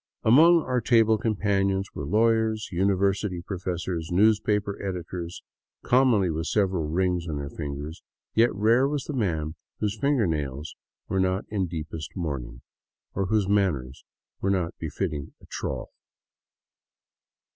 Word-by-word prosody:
Among 160 +8 +6
our 125 -1 0
table 110 -1 +4
companions 100 -3 0
were 70 - -5
lawyers, 110 +2 +2
university 95 0 +1
professors, 90 -3 -3
newspaper 105 +1 +2
editors, 90 -2 -5 0.4
commonly 120 -8 +4
with 80 +1 -3
several 95 -6 +1
rings 90 +1 0
on 75 - -2
their 70 0 -5
fingers; 75 +2 -6 0.3
yet 115 +2 +4
rare 115 +6 +4
was 145 -2 -2
the 150 - -5
man 80 - -1 0.3
whose 105 +1 -2
finger 140 -5 +2
nails 75 -2 -3 0.3
were 95 - 0
not 95 +1 +1
in 100 -4 -1
deepest 80 -1 -6
mourning, 65 -8 -4 0.5
or 95 0 -1
whose 105 -1 +2
manners 85 -11 0 0.4
were 95 - +1
not 90 -4 0
befitting 75 -2 -4
a - - -17
trough. - - -5
95 Hz, 130 wpm, -26 LUFS, 80-110 Hz, 0.5 s, Among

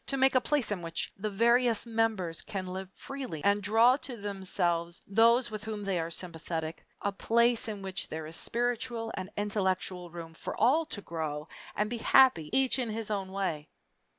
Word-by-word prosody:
To 275 - -1
make 265 0 +5
a 255 - +4
place 275 -7 +1
in 195 -4 -2
which 165 0 -3
the 215 +2 -3
various 235 +3 +3
members 220 -7 0
can 195 -3 -5
live 185 +1 -5
freely 260 - -6
and 205 +1 +3
draw 225 +5 +5
to 255 -4 -7
themselves 185 -4 -2
those 230 +4 +4
with 215 -1 -5
whom 215 -2 -4
they 195 -3 0
are 165 0 -2
sympathetic 165 -1 -5 0.2
a 200 - +1
place 235 +3 +2
in 205 -3 -5
which 190 0 -3
there 160 0 -5
is 160 +1 -7
spiritual 235 0 -1
and 190 0 -5
intellectual 190 -3 -1
room 165 -1 -8
for - - -6
all 290 +8 +4
to 205 - -5
grow 155 -2 -4 0.3
and 210 - +1
be 240 +2 -3
happy 230 - +5
each 265 0 +2
in 245 -3 -1
his 220 0 -3
own 195 -2 -2
way? 175 -6 -2
205 Hz, 185 wpm, -30 LUFS, 180-235 Hz, 0.3 s, make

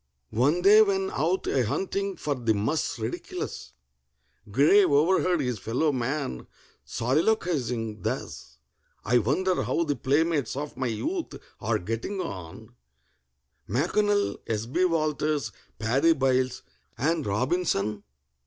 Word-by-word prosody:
One 145 +10 +2
day, 210 +3 +8
when 195 -2 +1
out 175 +6 0
a 130 - +1
hunting 195 - -2
for 150 - -1
the 115 -5 0
mus 130 +10 -1
ridiculus, 110 - -5 0.8
GRAY 145 - +5
overheard 175 +2 +3
his 125 -5 -2
fellow 125 +10 0
man 130 - -3 0.4
soliloquizing 125 - 0
thus: 70 - -5 0.5
"I 120 +2 +4
wonder 175 - +1
how 170 - 0
the 145 -3 -1
playmates 145 -1 +1
of 145 +1 -5
my 130 - -2
youth 320 - -3 0.2
are 110 +1 0
getting 115 - -4
on, 90 - -7 1.0
M'CONNELL, 205 - +1
S. 110 0 -1
B. 140 +10 +1
WALTERS, 155 -6 0 0.3
PADDY 135 +10 +3
BYLES, 130 -3 0 0.3
and 155 +5 0
ROBINSON?" 105 - 0
140 Hz, 115 wpm, -27 LUFS, 115-175 Hz, 1.0 s, day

